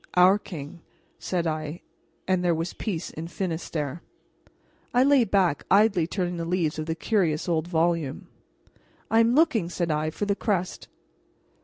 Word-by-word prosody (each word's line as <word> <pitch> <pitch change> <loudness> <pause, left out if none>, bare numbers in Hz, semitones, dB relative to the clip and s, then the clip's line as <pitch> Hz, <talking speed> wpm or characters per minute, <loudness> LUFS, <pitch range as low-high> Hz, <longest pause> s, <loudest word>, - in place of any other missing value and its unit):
"Our 185 +3 +6
king," 160 -4 -9 0.4
said 175 -2 -2
I; 155 0 -3 0.5
and 185 -1 +1
there 175 -2 +2
was 165 +2 -3
peace 180 -6 -4
in 160 +2 -6
Finistere. 165 -4 -4 0.9
I 250 - +6
lay 275 -3 +5
back, 185 -7 +1
idly 195 -4 +4
turning 180 -1 -2
the 170 - -3
leaves 165 -3 -1
of 155 - -4
the 160 - -1
curious 170 -6 0
old 165 -1 0
volume. 165 -4 0 0.9
"I 225 - +5
am 230 +2 +4
looking," 260 - +3
said 175 -2 -1
I, 155 +1 0
"for 185 +6 -3
the 200 -1 +1
crest." 190 -5 -2
175 Hz, 155 wpm, -26 LUFS, 160-195 Hz, 0.9 s, Our